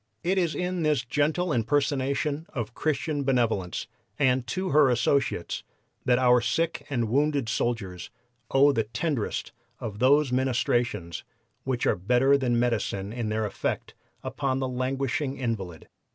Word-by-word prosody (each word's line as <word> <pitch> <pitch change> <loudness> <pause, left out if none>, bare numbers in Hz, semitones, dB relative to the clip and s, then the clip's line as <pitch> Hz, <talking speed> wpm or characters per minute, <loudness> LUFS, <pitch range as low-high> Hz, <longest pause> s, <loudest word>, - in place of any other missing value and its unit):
It 190 +2 +2
is 170 -3 0
in 180 0 -2
this 150 -5 +1
gentle 150 +6 0
impersonation 140 +4 0
of 115 -3 -3
Christian 150 0 -1
benevolence 115 -9 0 0.3
and 130 -3 +2
to 185 +11 -2
her 145 -3 +5
associates 125 -5 0 0.4
that 125 -1 +4
our 125 -1 +5
sick 165 +8 -1
and 120 -5 0
wounded 140 +1 +1
soldiers 110 -6 -2 0.4
owe 140 +2 +5
the 115 -5 0
tenderest 120 +1 -2 0.3
of 105 -3 -6
those 140 +2 +4
ministrations 120 -8 0 0.4
which 130 -3 -1
are - - +3
better 125 +9 +3
than 125 -4 +1
medicine 110 -4 -1
in 115 -3 -3
their 110 0 0
effect 105 - -3 0.3
upon 135 -2 -1
the 135 -1 -1
languishing 130 +2 -2
invalid. 100 - -4
130 Hz, 135 wpm, -27 LUFS, 115-145 Hz, 0.4 s, her